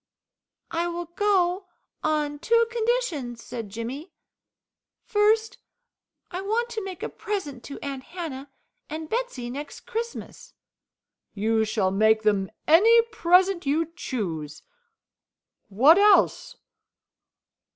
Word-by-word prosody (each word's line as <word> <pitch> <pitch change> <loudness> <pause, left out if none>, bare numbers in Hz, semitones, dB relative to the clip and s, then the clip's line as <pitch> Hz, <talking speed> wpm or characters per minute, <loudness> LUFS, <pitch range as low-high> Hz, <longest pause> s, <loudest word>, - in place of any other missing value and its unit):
"I 335 +1 0
will 345 0 -4
go 370 +1 +1 0.4
on 300 -1 0
two 465 +8 +3
conditions," 440 - -1
said 230 -4 -6
Jimmy. 245 - -6 0.9
"First, 440 +2 +2 0.7
I 365 +1 -4
want 450 +4 -1
to 445 -3 -4
make 375 -3 -7
a - - -1
present 300 - -5
to 280 - -7
Aunt 275 -2 -5
Hannah 295 -6 -7 0.4
and 315 0 -6
Betsey, 445 - -3
next 285 +3 -7
Christmas." 470 -1 -6 0.8
"You 220 +2 +1
shall 210 -3 0
make 220 +2 +3
them 200 -3 +1 0.2
any 450 +9 +6
present 365 -3 +3
you 320 +3 0
choose. 170 - -5 1.1
What 275 - +6
else?" 415 0 +4
330 Hz, 110 wpm, -25 LUFS, -, 1.1 s, any